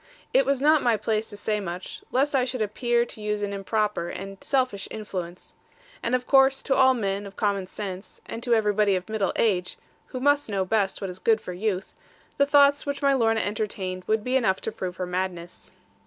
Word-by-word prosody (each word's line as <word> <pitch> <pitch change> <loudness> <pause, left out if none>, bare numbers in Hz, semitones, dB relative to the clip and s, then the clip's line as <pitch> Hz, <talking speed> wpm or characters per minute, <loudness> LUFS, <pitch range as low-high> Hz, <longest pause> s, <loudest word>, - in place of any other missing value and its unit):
It - - +4
was 275 -1 +2
not 305 0 +5
my 235 -3 +2
place 215 +1 -1
to 205 - -7
say 210 +1 -1
much, 180 -2 -6
lest 275 +3 +1
I 260 - +3
should 250 -2 -1
appear 240 +3 +1
to 220 - -8
use 210 0 -2
an 200 0 -2
improper 200 -2 -1
and 195 0 -8
selfish 255 -7 0
influence. 185 -5 -7 0.5
And 245 - +1
of 250 0 -2
course 270 -1 +4
to 270 - +1
all 260 -1 +5
men 200 -3 -2
of 195 - -12
common 200 -3 0
sense, 190 -1 -7
and 230 - -6
to 240 -1 +2
everybody 210 -2 +2
of 185 +3 -4
middle 215 -3 0
age 185 -5 0 0.3
(who 255 - -6
must 285 0 +2
know 195 -2 0
best 200 -1 0
what 195 -2 -3
is 180 - -9
good 225 +1 +3
for 180 - -7
youth), 195 0 -2 0.4
the 280 - +3
thoughts 285 0 +5
which 285 0 -4
my 280 0 +4
Lorna 225 -4 +2
entertained 200 -3 -3
would 215 0 +1
be 255 +2 -1
enough 205 -8 +2
to 225 - -3
prove 185 -5 -5
her 185 - -3
madness. 180 -1 -4
215 Hz, 210 wpm, -25 LUFS, 195-250 Hz, 0.5 s, not